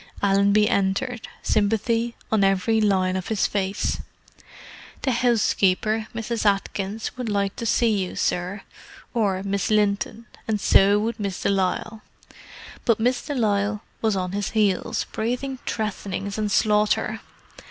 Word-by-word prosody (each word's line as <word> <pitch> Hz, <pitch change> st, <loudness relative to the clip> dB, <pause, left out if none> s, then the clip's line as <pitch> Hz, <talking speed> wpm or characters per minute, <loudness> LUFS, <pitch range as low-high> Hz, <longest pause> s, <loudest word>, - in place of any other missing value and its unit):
Allenby 200 Hz, +1 st, +4 dB
entered—sympathy 225 Hz, +1 st, 0 dB, 0.2 s
on 215 Hz, -2 st, +3 dB
every 195 Hz, +3 st, +2 dB
line 190 Hz, -3 st, +2 dB
of 185 Hz, -1 st, -3 dB
his 220 Hz, -3 st, +1 dB
face. 195 Hz, 0 st, -1 dB, 1.0 s
"The 265 Hz, -, +2 dB
'ousekeeper—Mrs. 225 Hz, -1 st, +1 dB
Atkins—would 205 Hz, +3 st, -1 dB
like 200 Hz, -1 st, 0 dB
to 230 Hz, -, -3 dB
see 230 Hz, -1 st, +3 dB
you, 180 Hz, -, -6 dB
sir. 185 Hz, +3 st, -1 dB, 0.5 s
Or 200 Hz, -5 st, 0 dB
Miss 200 Hz, -1 st, -1 dB
Linton. 210 Hz, +1 st, +1 dB, 0.2 s
And 215 Hz, -2 st, 0 dB
so 200 Hz, +1 st, +5 dB
would 220 Hz, +2 st, -2 dB
Miss 200 Hz, -2 st, -3 dB
de -, -, +2 dB
Lisle." 200 Hz, +3 st, -1 dB, 0.8 s
But 230 Hz, -3 st, +2 dB
Miss 245 Hz, +3 st, +1 dB
de 290 Hz, -, -4 dB
Lisle 210 Hz, -2 st, 0 dB, 0.2 s
was 220 Hz, -2 st, +1 dB
on 180 Hz, -1 st, -2 dB
his 200 Hz, 0 st, -2 dB
heels, 200 Hz, -4 st, +1 dB
breathing 250 Hz, +4 st, -2 dB
threatenings 200 Hz, -1 st, -3 dB
and 210 Hz, -1 st, -1 dB
slaughter. 215 Hz, +1 st, +2 dB
210 Hz, 125 wpm, -24 LUFS, 195-225 Hz, 1.0 s, so